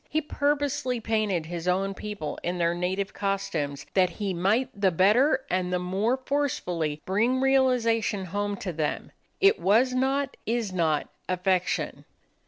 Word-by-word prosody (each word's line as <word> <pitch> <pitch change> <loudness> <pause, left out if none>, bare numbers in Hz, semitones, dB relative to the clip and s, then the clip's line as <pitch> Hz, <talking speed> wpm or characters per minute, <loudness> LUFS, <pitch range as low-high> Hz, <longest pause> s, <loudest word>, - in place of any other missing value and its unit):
He 310 - +1
purposely 285 -4 -1
painted 215 -7 0
his 170 +1 -5
own 195 +2 +1
people 205 -7 -5
in 175 +1 -2
their 170 -1 +2
native 185 +3 -2
costumes, 170 -8 -2
that 185 -2 +4
he 195 +2 -3
might 205 +9 +1
the 200 -2 +2
better 225 - +3
and 180 -1 -1
the 180 - +1
more 195 +8 0
forcefully 180 - -2
bring 225 +7 +1
realization 245 -6 +2
home 205 +2 -2
to 180 - -2
them. 155 -1 -2 0.3
It 395 +3 +5
was 235 +6 +3
not, 270 +2 0
is 225 -4 -1
not, 160 -4 +1 0.2
affectation. 185 0 0
200 Hz, 145 wpm, -27 LUFS, 180-255 Hz, 0.3 s, It